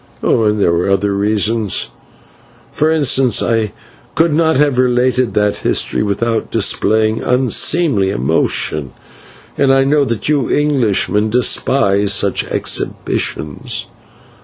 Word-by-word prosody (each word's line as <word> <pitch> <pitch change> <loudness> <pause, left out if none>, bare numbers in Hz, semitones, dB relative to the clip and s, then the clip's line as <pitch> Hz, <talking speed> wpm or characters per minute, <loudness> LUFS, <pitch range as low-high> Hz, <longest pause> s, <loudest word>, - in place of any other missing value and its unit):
"Also 110 -2 +2
there 100 -5 +1
were 85 +3 -1
other 100 +1 0
reasons: 105 +1 0 0.8
for 155 - 0
instance, 135 -6 +2
I 115 -3 -1 0.4
could 165 -1 +2
not 160 -1 +2
have 140 -3 +1
related 125 -2 +1
that 105 -1 +1
history - - -1
without 110 +2 -2
displaying 110 0 +1
unseemly 125 - +1
emotion, 70 +1 -1 0.7
and 140 -1 +3
I 135 0 +3
know 145 +2 +2
that 115 -5 -3
you 145 -5 0
Englishmen 115 -7 0
despise 105 -4 +1
such 100 -2 0
exhibitions. 75 -2 -3
115 Hz, 110 wpm, -15 LUFS, 100-135 Hz, 0.8 s, and